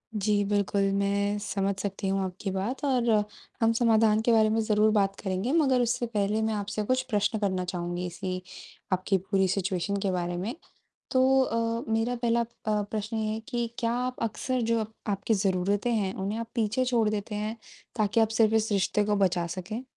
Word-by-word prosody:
जी 205 0 +2
बिल्कुल, 200 -1 +1
मैं 200 +1 +1
समझ 200 -2 -1
सकती 195 0 -3
हूँ 195 0 +1
आपकी 185 +1 -4
बात 210 +10 -3
और 250 -4 +2 0.5
हम 225 0 +4
समाधान 220 -2 +4
के 235 - +2
बारे 220 -1 +5
में 225 +1 +1
ज़रूर 215 0 +3
बात 195 -2 +2
करेंगे 190 +6 -2
मगर 265 -6 +3
उससे 240 0 0
पहले 210 0 0
मैं 220 0 0
आपसे 205 +1 -2
कुछ 255 +4 +1
प्रश्न 210 +1 +1
करना 185 -3 0
चाहूँगी 175 0 -3
इसी 185 +1 -4 0.5
आपकी 185 +1 +1
पूरी 190 0 +1
सिचुएशन 195 +1 -1
के 195 - 0
बारे 175 -1 -2
में। 210 +9 -3 0.6
तो 255 - +4 0.2
अ, 230 -1 -1
मेरा 225 +2 +1
पहला 235 0 +1
अ, - - -1 0.4
प्रश्न 215 +2 -4
ये 215 0 -1
है 220 - -3
कि 240 -1 -1
क्या 230 0 0
अप 255 - -6
अक्सर 255 +3 -1
जो 230 0 +1
अब 220 0 -5 0.2
आपकी 200 +3 0
ज़रूरतें 200 +3 +1
हैं 195 -4 0
उन्हें 200 +4 -3
आप 230 - -4
पीछे 230 +2 +1
छोड़ 235 -4 +2
देते 210 0 -3
हैं 215 +2 -3 0.4
ताकि 215 +1 +2
आप 220 -1 +4
सिर्फ़ 220 0 +4
इस 220 0 +1
रिश्ते 205 +1 +2
को 210 0 +1
बचा 180 -3 +1
सकें? 190 +7 -5
210 Hz, 190 wpm, -28 LUFS, 195-230 Hz, 0.6 s, बारे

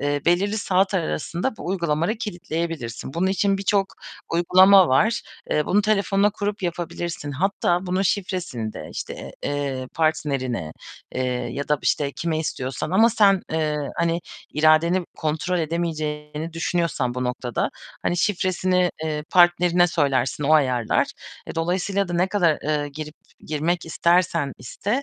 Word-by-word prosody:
eee, 145 0 0
belirli 200 +5 +2
saat 190 0 +1
arasında 175 - -2
bu - - -8
uygulamaları 170 +1 0
kilitleyebilirsin. 165 - -4
Bunun 180 +3 +1
için 195 +1 +1
birçok 195 0 +2 0.5
uygulama 185 +2 +6
var. 215 - +3 0.3
Eee, 150 - +1
bunu 205 +3 +3
telefonuna 205 -1 +2
kurup 205 -1 -3
yapabilirsin. 170 -3 -4
Hatta 180 +3 0
bunun 185 +2 0
şifresini 180 - -2
de, - - -8
işte, - - -6
eee, 140 -3 -2
partnerine, 135 - -1 0.4
eee, 130 - -1 0.3
ya 140 +1 -4
da, 150 -1 +2
işte, 140 -2 +1
kime 165 -2 -2
istiyorsan 135 -2 -3
ama 225 +5 +5
sen, 200 -4 +4
eee, 155 -2 0 0.2
hani 170 0 +1 0.3
iradeni 160 +4 +4
kontrol 160 +4 -1
edemeyeceğini 155 -1 -3
düşünüyorsan 165 -6 -1
bu 125 0 -2
noktada; 125 -1 -2 0.3
hani 175 - 0
şifresini, 185 -1 +1
eee, 150 -1 -2
partnerine 175 0 +5
söylersin, 140 -4 0
o 150 - +3
ayarlar. 125 -6 +2 0.4
E, - - -7
dolayısıyla 185 +4 0
da 175 - -4
ne 175 +2 +2
kadar, 175 -6 +2
eee, 150 -1 -1
girip 150 +1 -8 0.3
girmek 160 +3 -1
istersen 170 +2 +3 0.3
iste, 205 - -2
170 Hz, 135 wpm, -23 LUFS, 150-185 Hz, 0.5 s, uygulama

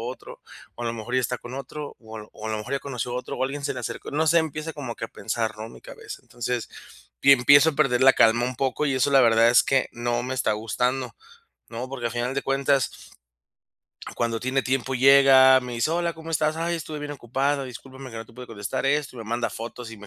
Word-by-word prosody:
otro, 120 +2 -8 0.4
o 120 - -7
a - - -1
lo 115 - -1
mejor 115 +2 -6
ya 130 - +3
está 125 +1 -2
con 120 - -10
otro, 140 +2 -7
o 110 -1 -11
a 110 - -6
lo 105 - -14
o 110 - -9
a - - -3
lo 110 - -2
mejor 105 +5 -7
ya - - 0
conoció 125 -4 -5
a - - -2
otro, 125 - -5
o - - -2
alguien 140 +1 -4
se - - -1
le - - -5
acercó". - - -6
No 160 +2 +1
sé, 170 +2 +5
empieza 160 0 -3
como 130 -6 -6
que - - -6
a - - -7
pensar, 110 -1 -3
¿no?, 110 +1 -6
mi - - -14
cabeza. - - -10
Entonces, 120 0 -4 0.5
y 140 - +7
empiezo 145 +5 +6
a - - -9
perder 135 -4 +2
la 135 0 +8
calma 115 +2 +4
un 125 +1 -3
poco, 135 +4 -1
y 140 - 0
eso 130 +2 +1
la 135 -1 +6
verdad 115 -1 +5
es 120 - +6
que 135 -1 +1
no 120 0 -2
me 130 +1 -3
está 125 -4 0
gustando, 125 +5 -2 0.5
¿no?, 120 +2 -5
porque 125 -3 -4
al - - -6
final 120 +2 -2
de 140 - -1
cuentas 135 -1 +1 1.3
cuando 115 -1 -1
tiene 130 +2 -1
tiempo 130 0 -1
llega, 130 0 +7
me 125 -1 -7
dice: 115 +7 0
"Hola, 170 0 0
¿cómo 160 0 -10
estás? 155 0 0
Ay, 170 +1 -1
estuve 155 -1 -6
bien 145 0 -5
ocupada, 135 +2 -1
discúlpame 130 +1 -10
que 115 - -9
no 115 - -6
te 115 - -19
pude 125 +1 -10
contestar 105 +3 -4
esto," 145 -1 0
y - - -9
me 115 - -7
manda 120 0 -2
fotos 115 +1 -8
y 115 - -9
me 105 0 -13
130 Hz, 255 wpm, -24 LUFS, 120-140 Hz, 1.3 s, la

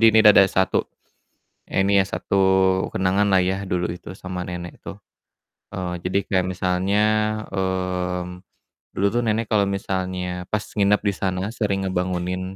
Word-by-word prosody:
Di 115 - +4
ini 110 - +5
da 105 - +10
ada 95 - +8
satu, 95 -1 +1 1.0
ini 95 +1 +2
ya 95 - +2
satu - - -3 0.6
kenanganlah 95 +1 +2
ya 95 +1 0
dulu 90 -1 0
itu 90 - -12
sama 90 -1 -5
nenek 85 -1 -6
tuh. - - -7 0.8
Eee, 90 -1 -3
jadi 95 +2 0
kayak 95 -2 +2
misalnya, 95 +3 0 0.5
mmm, 90 -1 -2 0.5
dulu 100 - +1
tuh 120 - +1
nenek 110 +1 +1
kalau 100 -2 +3
misalnya 95 -2 -3
pas 105 -1 0
nginap 105 0 +3
di 100 - +2
sana 95 -1 -2
sering 100 -4 -1
ngebangunin 90 0 -2
95 Hz, 150 wpm, -23 LUFS, 90-100 Hz, 1.0 s, da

